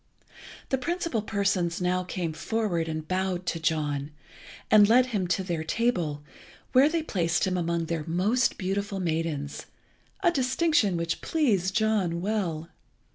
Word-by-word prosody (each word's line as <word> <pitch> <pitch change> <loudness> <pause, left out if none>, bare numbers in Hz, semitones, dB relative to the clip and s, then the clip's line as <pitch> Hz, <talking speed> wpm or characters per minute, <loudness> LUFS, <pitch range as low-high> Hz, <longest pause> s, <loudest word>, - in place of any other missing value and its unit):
The 265 - +1
principal 335 -5 -1
persons 195 -5 0
now 180 0 0
came 175 -3 -3
forward 175 -1 -1
and 155 -1 -4
bowed 185 -1 -1
to 170 - -2
John, 150 -3 -1 0.6
and 210 -1 +7
led 250 +2 +6
him 205 -8 -2
to 185 +2 0
their 170 -3 -2
table, 160 -7 -1 0.5
where 270 +3 +6
they 330 0 -1
placed 175 - 0
him 185 -1 -1
among 170 -1 -1
their 165 -1 -2
most 205 +9 +1
beautiful 195 +1 -2
maidens, 160 -4 -2 0.6
a 345 - +5
distinction 260 - +2
which 170 0 -2
pleased 200 - +1
John 210 -7 +1
well. 175 -5 -2
185 Hz, 140 wpm, -27 LUFS, 165-220 Hz, 0.6 s, and